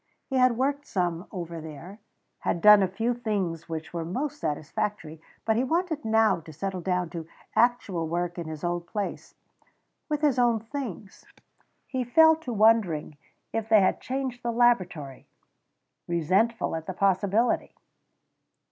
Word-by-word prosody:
He 265 - -2
had 255 -2 +4
worked 280 +3 -1
some 175 -1 -2
over 170 -4 -6
there, 160 +6 -10 0.4
had - - -1
done 210 +3 +8
a 190 - +3
few 225 +6 -1
things 195 -9 -3
which 160 0 -5
were 170 -1 -2
most 280 - -3
satisfactory, 155 +2 -3 0.2
but 220 -1 +2
he 245 - +2
wanted 320 +1 -1
now 220 -3 +3
to 160 0 -12
settle 185 +4 -4
down 180 -1 -1
to 165 -2 -6 0.3
actual 220 -8 +2
work 175 +1 -2
in 170 - -5
his 155 -1 -7
old 175 0 -2
place, 205 +3 -5 0.7
'with 300 -1 -1
his 285 -5 +2
own 240 -2 +3
things. 225 - -7 0.6
He 260 -2 -2
fell 320 +7 +6
to 320 -6 -7
wondering 210 -9 +2 0.4
if 225 -1 -2
they 215 -2 +6
had 190 - +1
changed 260 -2 -3
the 240 -1 -1
laboratory, 185 - +1 0.8
resentful 185 +7 +1
at 160 0 -6
the 190 - -3
possibility. 200 +4 +1
200 Hz, 150 wpm, -27 LUFS, 170-240 Hz, 0.8 s, done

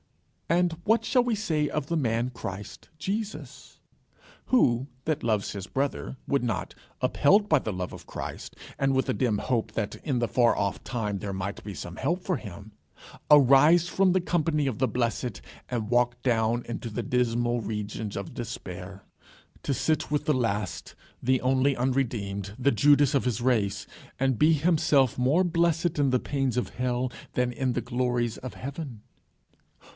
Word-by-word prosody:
And 175 0 +2
what 225 +5 +2
shall 250 -2 +3
we 240 -2 0
say 160 -8 0
of 150 - -2
the 170 - -1
man 120 -4 0
Christ 100 -4 -8
Jesus? 205 +6 -5 0.7
Who, 130 - +3 0.2
that 155 -2 -1
loves 110 -4 0
his 100 -1 -6
brother, 135 0 -2
would 140 -2 +1
not, 115 -6 -2 0.3
upheld 205 +8 +4
by 155 -6 +4
the 110 - -4
love 90 -2 -4
of - - -11
Christ, - - -7 0.2
and 135 0 +2
with 130 0 +1
a - - +2
dim 120 -5 +1
hope 115 -2 -1
that 105 -2 -2
in 140 -6 0
the 120 - +1
far 120 +2 +3
off 100 -1 -1
time 105 -5 -3
there 100 +1 -4
might 95 +1 -4
be 105 - -6
some 85 +3 -7
help 180 +2 -1
for 185 - 0
him, 105 - -9 0.6
arise 150 +4 +7
from 190 +1 +3
the 185 - +3
company 160 -4 0
of 125 -6 -3
the 130 - +3
blessed, 120 0 -1 0.3
and 115 -4 -2
walk 120 0 +2
down 115 -1 +1
into 115 0 -5
the 115 +2 -3
dismal 120 +1 +1
regions 105 -1 -4
of 100 -2 -6
despair, 95 -4 -7 0.6
to 140 - 0
sit 155 +3 0
with 150 0 0
the 155 - +3
last, 105 - -2 0.3
the 130 +1 +3
only 130 +2 +2
unredeemed, 110 -6 -1
the 140 +2 +3
Judas 145 -1 +4
of 140 - +2
his 125 -2 0
race, 110 -5 +1 0.3
and 130 -3 +1
be 155 +2 +5
himself 150 -5 +3
more 140 +9 +3
blessed 170 -1 +1
in 140 -2 +3
the 125 0 +2
pains 135 -3 -1
of 125 - 0
hell, 125 0 -1 0.2
than 125 0 0
in 130 0 -1
the - - -1
glories 125 -2 -1
of 130 -1 -7
heaven? 135 -5 -7
125 Hz, 170 wpm, -27 LUFS, 110-145 Hz, 0.7 s, arise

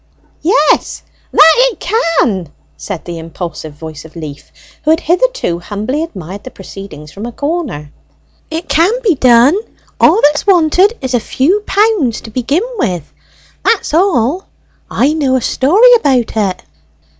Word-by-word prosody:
"Yes, 390 +10 +1 0.3
that 320 +1 +7
it - - +2
can!" 305 - 0 0.2
said 195 -5 -7
the 170 -1 -6
impulsive 160 -1 -7
voice 155 0 -9
of 160 +1 -15
Leaf, 150 -4 -9 0.3
who 305 - -1
had 325 +2 +3
hitherto 365 - 0
humbly 215 - -3
admired 200 - -7
the - - -8
proceedings 195 - -11
from 205 +7 -7
a - - -6
corner. 285 - -4 0.6
"It 325 +2 -5
can 335 +6 +3
be 410 -6 +3
done 250 0 +5 0.5
all - - +5
that's 295 +5 +2
wanted 370 +4 +3
is 260 -1 -3
a 245 - +3
few 290 - 0
pounds 405 - +1
to 220 - -11
begin 260 - 0 0.2
with. 180 - -2 0.5
That's 430 -8 +1
all! 335 - +1 0.4
I 280 +5 +1
know 280 -5 +1
a 260 - +1
story 395 - +4
about 265 - +2
it!" 195 -4 -1
260 Hz, 145 wpm, -13 LUFS, -, 0.6 s, that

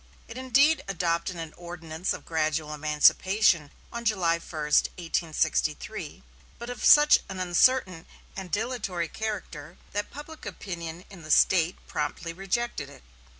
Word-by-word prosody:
It 230 - -10
indeed 270 +5 +3
adopted 170 -1 -1
an 165 -2 -7
ordinance 170 0 -5
of - - -5
gradual 155 -1 -1
emancipation 155 +3 +3 0.2
on 235 0 -5
July 180 -7 +1
1, - - -17
1863, 155 - -1 0.3
but 235 +1 -6
of 245 - -7
such 295 0 +7
an 190 -1 -6
uncertain 185 0 +2 0.3
and 190 -2 -6
dilatory 205 -5 -2
character, 175 -7 -6
that 205 +1 -3
public 305 +2 -10
opinion 170 -2 -7
in 190 -3 -11
the 155 - -11
State 175 +2 +4
promptly 160 +3 -4
rejected 195 - -3
it. 140 - -15
175 Hz, 130 wpm, -27 LUFS, 160-215 Hz, 0.3 s, such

